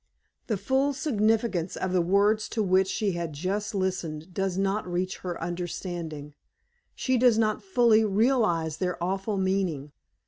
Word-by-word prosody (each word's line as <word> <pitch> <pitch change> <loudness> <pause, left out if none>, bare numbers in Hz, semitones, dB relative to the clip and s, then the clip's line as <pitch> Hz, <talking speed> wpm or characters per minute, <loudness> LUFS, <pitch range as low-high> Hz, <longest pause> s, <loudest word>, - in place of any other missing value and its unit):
The 215 - 0
full 270 +7 +1
significance 220 - 0
of 185 -1 -2
the 180 - +3
words 205 +4 +2
to 220 - +3
which 190 0 +3
she 205 +1 0
has 170 -2 -3
just 200 +8 -3
listened 180 -3 -3
does 195 -1 -1
not 195 -1 -1
reach 185 +1 -2
her 180 -2 -5
understanding. 170 -3 -5 0.6
She 260 -2 +1
does 245 -2 +5
not 215 -1 +1
fully 240 - +4
realize 205 - +1
their 180 -1 -2
awful 195 +3 -1
meaning. 190 -7 -1
190 Hz, 145 wpm, -27 LUFS, 175-215 Hz, 0.6 s, does